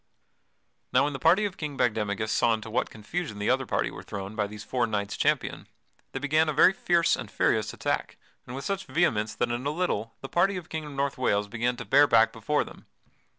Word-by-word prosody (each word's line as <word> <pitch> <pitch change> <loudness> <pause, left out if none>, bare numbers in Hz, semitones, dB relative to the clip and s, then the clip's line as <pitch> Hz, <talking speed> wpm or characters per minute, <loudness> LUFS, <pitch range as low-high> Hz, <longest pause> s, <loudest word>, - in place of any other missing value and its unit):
Now 130 - +4
when 145 0 -1
the 135 - -5
party 180 +9 +4
of 195 -2 -4
King 150 -3 -5
Bagdemagus 110 -3 0
saw 115 -1 +3
into 110 0 -8
what 120 - 0
confusion 110 +3 -5
the 105 +3 +1
other 130 -1 0
party - - 0
were - - -9
thrown 100 +1 -7
by 105 -2 0
these 105 +1 -9
four 120 +1 0
knights 100 -2 -2
champion, - - 0 0.4
they - - -4
began 155 +3 +2
a - - 0
very 170 +6 +6
fierce 170 -3 +2
and - - -7
furious - - +1
attack, - - -2 0.3
and 125 - -6
with 135 - -6
such 195 -1 -3
vehemence 115 -11 +1
that 120 -1 0
in 120 +1 -2
a 140 - 0
little 145 - -2
the 135 - -6
party 190 +6 +2
of 180 - -5
the - - -25
King 160 -1 -4
of 150 - -8
North 140 -1 -2
Wales 105 -5 +1
began 120 +3 -1
to - - -6
bear 145 +2 +5
back 115 -2 +4
before 145 +7 0
them. - - -14
130 Hz, 230 wpm, -27 LUFS, 110-155 Hz, 0.4 s, very